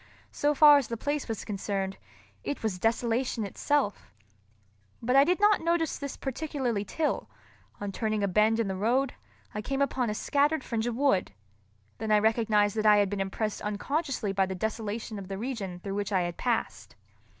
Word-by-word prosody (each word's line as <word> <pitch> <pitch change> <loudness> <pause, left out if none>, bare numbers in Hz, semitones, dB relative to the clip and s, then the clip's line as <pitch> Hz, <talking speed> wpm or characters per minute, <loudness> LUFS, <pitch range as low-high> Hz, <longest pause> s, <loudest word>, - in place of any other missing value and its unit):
So 295 0 +1
far 295 0 +8
as 265 - -4
the 230 - -4
place 290 +4 -2
was 225 -3 -4
concerned, 195 -2 -3 0.5
it 285 - -4
was 200 -5 -1
desolation 230 +1 0
itself. 265 +2 -1 0.9
But 250 +3 0
I 275 - +8
did 355 +5 +1
not 415 0 +4
notice 335 -1 0
this 280 -1 -5
particularly 265 -6 -2
till, 300 +9 -2 0.5
on 205 -1 -4
turning 215 0 -1
a - - +2
bend 215 +4 +3
in 225 - +1
the 190 - -2
road, 245 +7 +1 0.4
I 210 - -3
came 270 +5 -2
upon 260 -4 +1
a 210 - -2
scattered 290 +4 +1
fringe 230 0 -2
of 240 - -2
wood; 260 - +1 0.7
then 220 0 -2
I 210 - +6
recognized 215 -1 +2
that 215 - 0
I 210 0 +7
had 205 -1 +2
been 200 -1 -1
impressed 205 +2 -2
unconsciously 245 +2 -2
by 195 -1 +2
the 190 - -4
desolation 220 +1 -3
of 190 - -8
the 195 0 -5
region 205 -6 -4
through 195 0 -4
which 205 +1 -2
I 190 -2 +2
had 175 -1 -3
passed. 240 +2 -2
225 Hz, 185 wpm, -28 LUFS, 205-275 Hz, 0.9 s, far